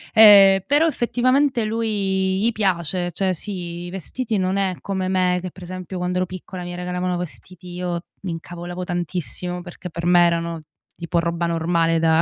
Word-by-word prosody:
ehm, 200 -3 +9
però 295 +4 +4
effettivamente 255 -1 +2
lui 195 -4 0
gli 235 +2 +3
piace, 180 -4 -1
cioè 190 +2 0
sì, 175 -2 -6
i - - -6
vestiti 215 +4 -3
non 185 +1 0
è 190 -2 0
come 190 -2 -2
me 185 -1 +2
che 180 -1 -6
pre 185 - -11
esempio 185 0 -6
quando 180 0 -1
ero 185 - +1
piccola 185 0 -8
mi 175 0 -6
regalavano 180 0 -2
vestiti, 180 +1 -6
io 175 -1 -3 0.2
m'incavolavo 175 0 -6
tantissimo 175 +1 -3
perché 175 0 -9
per 170 +1 -3
me 175 0 +6
erano 170 -1 -1 0.3
tipo 170 0 -1
roba 170 0 -1
normale 165 0 +1
da 160 0 +4
180 Hz, 165 wpm, -22 LUFS, 175-195 Hz, 0.3 s, ehm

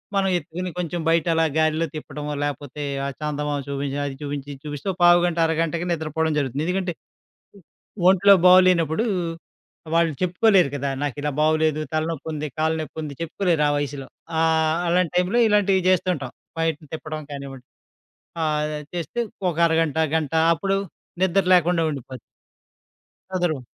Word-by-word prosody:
మనం 195 -1 +2
ఎత్తుకొని 180 +2 -5
కొంచెం 175 -1 -3
బయట 165 +1 +3
అలా 165 0 +3
గాలిలో 155 +1 +2
తిప్పడమో 150 -1 -6
లేకపోతే, 145 0 -4 0.2
ఆ - - -1
చందమామ 150 -1 -2
చూపించి, 140 0 -3
అది 135 - -6
చూపించి, 145 -1 -5
ఇది 135 - -13
చూపిస్తే 150 +6 -3
పావుగంట, 175 -1 +5
అరగంటకే 165 +2 -1
నిద్రపోవడం 160 -1 -1
జరుగుతుంది. 140 +2 -2
ఎందుకంటే... 180 -1 -1 1.2
ఒంట్లో 195 +1 +6
బాగులేనప్పుడూ, 180 0 +5 0.9
వాళ్ళు 165 -1 +3
చెప్పుకోలేరు 185 -1 +3
కదా! 140 0 -2
నాకు 145 -4 -2
ఇలా 150 0 -1
బాగులేదు, 155 0 +2
తలనొప్పుంది, 155 -1 -2
కాళ్ళ 160 +1 +1
నొప్పుంది 155 -1 -6
చెప్పుకోలేరు 165 -1 0
ఆ - - +2
వయసులో. 140 -1 -4 0.3
ఆహ్, 160 -1 +2
ఆ - - -3
అలాంటి 175 -1 +2
టైంలో 180 +6 +2
ఇలాంటివి 200 -3 +3
చేస్తూంటాం. 175 -8 0 0.3
బయటని 160 -2 -2
తిప్పడం 155 -1 -5
కానివ్వండి. 135 -2 -8 0.8
ఆహ్ 155 -1 +1 0.2
అది 150 - -12
చేస్తే 175 +7 -4 0.3
ఒక 165 - -5
అరగంట 160 -2 +1 0.2
గంట 155 -3 -1 0.2
అప్పుడు 195 +3 -1 0.4
నిద్ర 190 +1 +3
లేకుండా 175 -1 +2
ఉండిపోద్ది. 135 -3 -7 1.2
అందరు. 175 -5 0
160 Hz, 135 wpm, -23 LUFS, 150-175 Hz, 1.2 s, ఒంట్లో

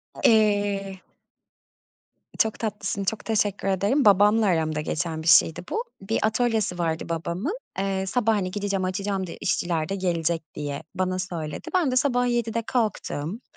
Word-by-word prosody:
A - - -11
eee 205 -3 +2 1.4
Çok 220 -1 +1
tatlısın, 200 -2 -3
çok 210 +3 -2
teşekkür 205 -3 0
ederim. 200 +9 +2
Babamla 210 +2 +5
aramda 160 -4 +1
geçen 160 0 -3
bir - - -5
şeydi 165 -1 +5
bu. 455 - -1 0.2
Bir 205 +4 -1
atölyesi 220 -4 +1
vardı 165 0 -1
babamın. 175 - -2 0.2
Eee, 195 -1 -1
sabah, 225 +2 +1
hani, 185 -2 -1
gideceğim 200 -1 -1
açacağım, 195 0 -2
de - - -8
işçiler 170 -3 -1
de 195 - -1
gelecek, 170 -3 -1
diye 145 -1 -4
bana 185 0 -1
söyledi. 170 -5 -5
Ben 335 -8 +2
de - - 0
sabah 245 -2 +2
07.00'de 230 -1 0
kalktım, 215 - -2
195 Hz, 150 wpm, -25 LUFS, 175-220 Hz, 1.4 s, Babamla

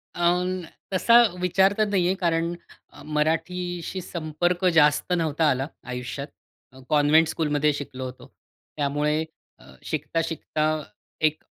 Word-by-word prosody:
अ, 180 0 0 0.3
तसा 230 +5 +4 0.3
विचार 190 +2 +3
तर 215 -1 +2
नाहीये 185 -2 +2
कारण 170 -2 0 0.6
मराठीशी 175 +4 -1
संपर्क 175 +2 -2
जास्त 150 +3 +4
नव्हता 160 -1 0
आला 135 +1 0 0.3
आयुष्यात. 125 +3 -5 0.4
अ, 130 - -15
कॉन्व्हेंट 150 +2 +4
स्कूलमध्ये 150 -2 +1
शिकलो 130 -2 -6
होतो. 130 0 -10 0.5
त्यामुळे 150 +2 0 0.4
अ, - - -18 0.2
शिकता-शिकता 165 -1 -3 0.7
एक 155 0 -4
160 Hz, 110 wpm, -25 LUFS, 150-180 Hz, 0.7 s, तसा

